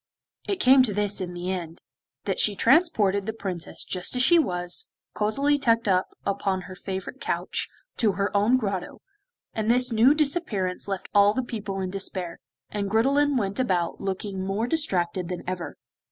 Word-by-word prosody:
It 395 Hz, -2 st, -1 dB
came 265 Hz, -4 st, +6 dB
to 220 Hz, -6 st, +1 dB
this 205 Hz, -1 st, 0 dB
in 180 Hz, -1 st, -5 dB
the 175 Hz, +1 st, -3 dB
end, 170 Hz, -3 st, -5 dB, 0.5 s
that -, -, -1 dB
she 210 Hz, -, +4 dB
transported 215 Hz, -, +3 dB
the 220 Hz, -, -2 dB
Princess 185 Hz, -6 st, -5 dB
just 180 Hz, +6 st, -1 dB
as 250 Hz, -, +2 dB
she 340 Hz, +5 st, +6 dB
was, 180 Hz, -, -1 dB, 0.3 s
cosily 275 Hz, +8 st, +1 dB
tucked 230 Hz, -4 st, +2 dB
up 185 Hz, -1 st, +2 dB, 0.2 s
upon 195 Hz, -1 st, -1 dB
her 185 Hz, -, -10 dB
favourite 190 Hz, +7 st, -6 dB
couch, -, -, -2 dB, 0.3 s
to 215 Hz, -4 st, +2 dB
her 200 Hz, +2 st, -2 dB
own 210 Hz, +5 st, +4 dB
Grotto, 200 Hz, -6 st, -4 dB, 0.5 s
and 220 Hz, 0 st, -2 dB
this 250 Hz, +1 st, +3 dB
new 235 Hz, +6 st, +5 dB
disappearance 275 Hz, -, -1 dB
left 195 Hz, -1 st, -4 dB
all 205 Hz, +1 st, +5 dB
the 260 Hz, -, 0 dB
people 210 Hz, -5 st, -5 dB
in 185 Hz, -1 st, -3 dB
despair, 185 Hz, -3 st, -2 dB, 0.3 s
and 200 Hz, -1 st, -2 dB
Gridelin 275 Hz, +6 st, +2 dB
went 200 Hz, 0 st, -2 dB
about 180 Hz, -9 st, 0 dB
looking 195 Hz, 0 st, -3 dB
more 195 Hz, +4 st, -1 dB
distracted 185 Hz, -, 0 dB
than 180 Hz, -, -5 dB
ever. 180 Hz, -1 st, -5 dB
200 Hz, 170 wpm, -25 LUFS, 185-250 Hz, 0.5 s, came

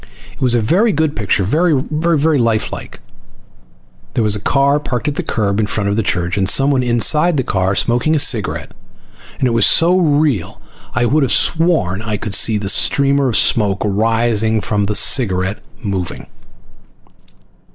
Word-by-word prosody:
It -, -, -20 dB
was 125 Hz, -2 st, +2 dB
a 120 Hz, -, +1 dB
very 190 Hz, -, +1 dB
good 155 Hz, -2 st, -1 dB
picture. 100 Hz, -2 st, -1 dB
Very 155 Hz, -, +1 dB
lifelike. 150 Hz, -6 st, -1 dB, 1.2 s
There 115 Hz, -, +1 dB
was 105 Hz, -1 st, +1 dB
a -, -, -4 dB
car 140 Hz, +6 st, +1 dB
parked 125 Hz, -1 st, -4 dB
at 145 Hz, -, -2 dB
the -, -, -2 dB
curb 100 Hz, -2 st, -2 dB
in 105 Hz, -, 0 dB
front 100 Hz, -1 st, -1 dB
of -, -, -1 dB
the 115 Hz, -, 0 dB
church, 90 Hz, -1 st, -2 dB
and 95 Hz, 0 st, 0 dB
someone 135 Hz, +3 st, +2 dB
inside 150 Hz, +7 st, +2 dB
the 130 Hz, -, 0 dB
car 95 Hz, -3 st, -1 dB
smoking 125 Hz, +9 st, +1 dB
a -, -, +2 dB
cigarette, 120 Hz, -8 st, 0 dB, 0.7 s
and 130 Hz, -, 0 dB
it -, -, -1 dB
was 115 Hz, -, +3 dB
so 170 Hz, +2 st, +3 dB
real 145 Hz, -, 0 dB, 0.4 s
I 120 Hz, +2 st, +1 dB
would 150 Hz, +6 st, +1 dB
have 135 Hz, -, 0 dB
sworn 160 Hz, -, +1 dB
I 110 Hz, -1 st, -4 dB
could 105 Hz, -, -5 dB
see 110 Hz, +2 st, +3 dB
the 100 Hz, -1 st, -5 dB
streamer 140 Hz, +5 st, +2 dB
of 115 Hz, -, -2 dB
smoke 100 Hz, -3 st, +1 dB
rising 110 Hz, +1 st, 0 dB
from 105 Hz, -1 st, -2 dB
the 105 Hz, +1 st, -2 dB
cigarette 100 Hz, -4 st, +1 dB, 0.2 s
moving. 95 Hz, -4 st, -5 dB
115 Hz, 170 wpm, -16 LUFS, 105-145 Hz, 1.2 s, was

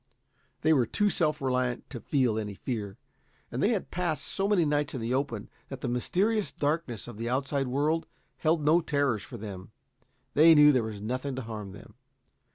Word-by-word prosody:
They 160 Hz, +1 st, +5 dB
were 125 Hz, -6 st, +3 dB
too 205 Hz, -, +1 dB
self 155 Hz, -4 st, +1 dB
reliant 125 Hz, -2 st, 0 dB
to 125 Hz, -, -5 dB
feel 125 Hz, -4 st, +1 dB
any 105 Hz, -2 st, -5 dB
fear, 105 Hz, -4 st, -4 dB, 0.5 s
and 125 Hz, -, -3 dB
they 205 Hz, -, +4 dB
had 215 Hz, -6 st, -1 dB
passed 175 Hz, -3 st, -2 dB
so 195 Hz, 0 st, -1 dB
many 195 Hz, -5 st, +3 dB
nights 145 Hz, -1 st, 0 dB
in -, -, -3 dB
the 115 Hz, +2 st, -1 dB
open 130 Hz, -6 st, -2 dB, 0.2 s
that -, -, -7 dB
the -, -, -2 dB
mysterious 195 Hz, -, 0 dB
darkness 145 Hz, -7 st, -2 dB
of 115 Hz, -3 st, -9 dB
the 115 Hz, +1 st, -2 dB
outside 135 Hz, +1 st, 0 dB
world 150 Hz, +6 st, 0 dB, 0.3 s
held 160 Hz, -1 st, +2 dB
no 160 Hz, +4 st, +5 dB
terrors 140 Hz, -8 st, 0 dB
for 120 Hz, -, -9 dB
them. 100 Hz, -4 st, -8 dB, 0.6 s
They 160 Hz, +2 st, +7 dB
knew 150 Hz, 0 st, +8 dB
there 130 Hz, -3 st, +3 dB
was 110 Hz, -2 st, -5 dB
nothing 130 Hz, +5 st, -3 dB
to 130 Hz, -, -4 dB
harm 105 Hz, -4 st, -7 dB
them. 105 Hz, -, -13 dB
135 Hz, 190 wpm, -29 LUFS, 115-155 Hz, 0.6 s, knew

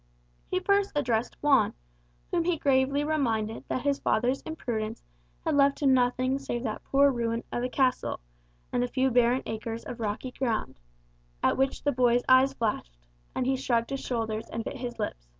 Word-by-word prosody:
He 370 Hz, -, +1 dB
first 400 Hz, +1 st, +2 dB
addressed 240 Hz, -5 st, 0 dB
Juan, 285 Hz, -2 st, +4 dB, 0.6 s
whom 340 Hz, -1 st, +1 dB
he 350 Hz, -1 st, +1 dB
gravely 275 Hz, 0 st, +2 dB
reminded 230 Hz, -8 st, -1 dB
that 255 Hz, -, -2 dB
his 280 Hz, -1 st, +1 dB
father's 245 Hz, +5 st, +1 dB
imprudence 225 Hz, -8 st, -4 dB, 0.4 s
had -, -, +1 dB
left 280 Hz, +1 st, +3 dB
him 270 Hz, -2 st, +5 dB
nothing 255 Hz, +1 st, +2 dB
save 240 Hz, -3 st, -4 dB
that 220 Hz, -4 st, -4 dB
poor 280 Hz, +1 st, +4 dB
ruin 230 Hz, -2 st, -1 dB
of 240 Hz, -, -2 dB
a 250 Hz, -, -1 dB
castle, 255 Hz, -1 st, 0 dB, 0.5 s
and 245 Hz, -, +2 dB
a -, -, 0 dB
few 260 Hz, +1 st, +1 dB
barren 245 Hz, +1 st, +3 dB
acres 225 Hz, +1 st, -4 dB
of 245 Hz, -, -7 dB
rocky 220 Hz, +4 st, -3 dB
ground, 225 Hz, -, -2 dB, 0.6 s
at -, -, +3 dB
which 270 Hz, 0 st, 0 dB
the 285 Hz, -, +2 dB
boy's 245 Hz, -1 st, +3 dB
eyes 260 Hz, +1 st, +6 dB
flashed, 210 Hz, -, -2 dB, 0.4 s
and 255 Hz, -, 0 dB
he 265 Hz, +1 st, +2 dB
shrugged 240 Hz, -2 st, 0 dB
his 275 Hz, -, -2 dB
shoulders 225 Hz, -4 st, -3 dB
and 225 Hz, -, -4 dB
bit 275 Hz, -, -5 dB
his 245 Hz, -1 st, -5 dB
lip. -, -, -2 dB
255 Hz, 180 wpm, -28 LUFS, 230-275 Hz, 0.6 s, eyes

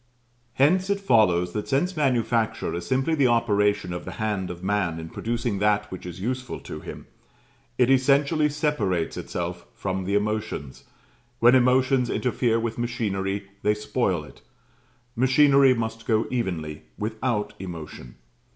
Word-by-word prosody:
Hence 185 Hz, +8 st, +3 dB
it 200 Hz, 0 st, +1 dB
follows 90 Hz, -, +3 dB
that 105 Hz, -, -3 dB
since 175 Hz, +7 st, 0 dB
Manufacture 120 Hz, -6 st, 0 dB
is 85 Hz, 0 st, -5 dB
simply 135 Hz, +5 st, +1 dB
the 140 Hz, -5 st, +3 dB
operation 105 Hz, -5 st, +1 dB
of 90 Hz, -, -5 dB
the 95 Hz, -, -7 dB
hand 105 Hz, -4 st, -2 dB
of 90 Hz, 0 st, -8 dB
man 95 Hz, -4 st, 0 dB
in 80 Hz, 0 st, -7 dB
producing 115 Hz, -1 st, -2 dB
that 105 Hz, 0 st, +1 dB
which 95 Hz, -1 st, -7 dB
is 90 Hz, +1 st, -8 dB
useful 125 Hz, +4 st, -3 dB
to -, -, -7 dB
him, -, -, -9 dB, 0.7 s
it 125 Hz, +1 st, +4 dB
essentially 140 Hz, +3 st, +3 dB
separates 125 Hz, -, -1 dB
itself 85 Hz, 0 st, -5 dB
from 95 Hz, -1 st, -3 dB
the 100 Hz, +2 st, 0 dB
emotions; 105 Hz, -9 st, -3 dB, 0.5 s
when 120 Hz, +1 st, +6 dB
emotions 130 Hz, 0 st, +3 dB
interfere 120 Hz, -2 st, +1 dB
with 115 Hz, 0 st, -3 dB
machinery 100 Hz, -5 st, -2 dB
they 105 Hz, 0 st, +2 dB
spoil 105 Hz, -6 st, -1 dB
it: 75 Hz, -, -15 dB, 0.7 s
machinery 135 Hz, +1 st, +5 dB
must 115 Hz, 0 st, -4 dB
go 110 Hz, -2 st, +2 dB
evenly, 85 Hz, -11 st, -3 dB, 0.2 s
without 110 Hz, 0 st, -2 dB
emotion. 80 Hz, -9 st, -8 dB
110 Hz, 140 wpm, -25 LUFS, 95-130 Hz, 0.7 s, when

